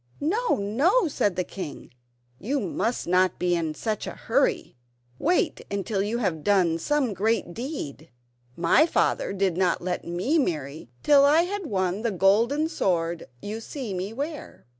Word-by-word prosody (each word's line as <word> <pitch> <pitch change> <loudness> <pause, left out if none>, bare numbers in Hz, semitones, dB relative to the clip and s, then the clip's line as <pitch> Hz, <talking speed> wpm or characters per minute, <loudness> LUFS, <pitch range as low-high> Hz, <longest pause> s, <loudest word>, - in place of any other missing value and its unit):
"No, 425 +12 +1
no!" 285 - +2
said 205 - 0
the 180 - 0
king; 175 -5 -8 0.5
"you 275 +7 -1
must 225 +4 -2
not 185 +1 +2
be 180 0 +1
in 160 -2 -2
such 215 +4 -3
a - - -5
hurry. - - 0 0.4
Wait 350 +1 +1 0.2
till 195 -1 -1
you 210 +4 -1
have 180 -10 -1
done 180 -5 +3
some 270 - 0
great 205 -1 0
deed. 195 - -6 0.5
My 175 - +4
father - - +1
did 195 -3 0
not 180 -2 +2
let 180 0 -3
me 185 - 0
marry 150 - -3
till 285 -1 +6
I 300 +4 +5
had 385 0 -4
won 190 -1 -1
the 230 - 0
golden 225 - +3
sword 170 - -1 0.2
you 215 +2 -4
see 235 -2 -6
me 185 +3 -3
wear." 290 +6 -6
205 Hz, 160 wpm, -25 LUFS, 180-280 Hz, 0.5 s, till